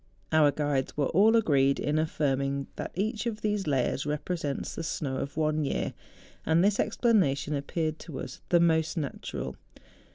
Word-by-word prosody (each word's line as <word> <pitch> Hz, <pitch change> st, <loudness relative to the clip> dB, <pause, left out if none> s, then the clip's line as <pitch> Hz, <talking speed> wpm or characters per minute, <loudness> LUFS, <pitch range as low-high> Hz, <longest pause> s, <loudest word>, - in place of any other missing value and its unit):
Our 155 Hz, -2 st, +5 dB
guides 145 Hz, -2 st, -1 dB
were 145 Hz, -2 st, +1 dB
all 210 Hz, +6 st, +5 dB
agreed 140 Hz, -10 st, +3 dB
in 150 Hz, +1 st, 0 dB
affirming 140 Hz, -3 st, 0 dB
that -, -, -4 dB
each 215 Hz, +5 st, -1 dB
of 220 Hz, -2 st, -3 dB
these 210 Hz, -4 st, -1 dB
layers 135 Hz, -1 st, +1 dB
represents 150 Hz, 0 st, -3 dB
the -, -, -5 dB
snow 145 Hz, -4 st, -3 dB
of 140 Hz, +3 st, -5 dB
one 155 Hz, -1 st, +1 dB
year; 140 Hz, -, -1 dB, 0.5 s
and 160 Hz, +2 st, +3 dB
this 205 Hz, +1 st, +2 dB
explanation 190 Hz, -, +2 dB
appeared 155 Hz, +2 st, -2 dB
to 150 Hz, -6 st, -7 dB
us -, -, -7 dB
the 175 Hz, -, +5 dB
most 160 Hz, -1 st, +2 dB
natural. 145 Hz, -4 st, -4 dB
155 Hz, 160 wpm, -28 LUFS, 140-180 Hz, 0.5 s, Our